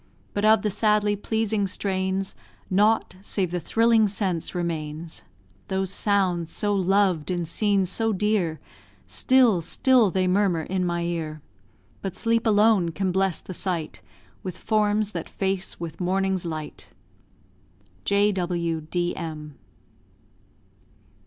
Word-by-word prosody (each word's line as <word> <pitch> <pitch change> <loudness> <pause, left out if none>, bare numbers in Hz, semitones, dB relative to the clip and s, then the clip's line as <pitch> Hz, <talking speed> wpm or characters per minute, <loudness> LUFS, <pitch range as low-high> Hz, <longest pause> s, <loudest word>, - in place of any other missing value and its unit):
But 205 +1 0
of 215 -1 +5
the 210 - 0
sadly 210 0 +2
pleasing 215 -1 -1
strains, 190 0 -2 0.4
Nought 210 0 +2
save 190 -3 -1
the 180 - -1
thrilling 225 +3 +3
sense 190 -5 -2
remains. 160 -2 -4 0.4
Those 190 -1 -1
sounds 185 -5 +1
so 205 -1 0
loved 190 -4 +2
in 175 -2 -1
scenes 195 +1 +1
so 225 +2 0
dear, 195 -5 0 0.5
Still 250 -8 +3
still 245 +5 +3
they 185 0 0
murmur 185 -3 +2
in 185 +2 -1
my 170 0 -1
ear: 160 -3 -4 0.6
But 195 -3 -4
sleep 230 0 +1
alone 210 -4 +4
can 185 +3 -1
bless 190 -1 0
the 185 - -8
sight 170 -4 -3 0.4
With 185 -2 -6
forms 210 -1 +1
that - - -5
face 190 -1 -2
with 165 +1 -6
morning's 190 0 0
light. 155 -2 -6 1.1
J.W.D.M. 170 -5 -1
190 Hz, 120 wpm, -25 LUFS, 175-210 Hz, 1.1 s, of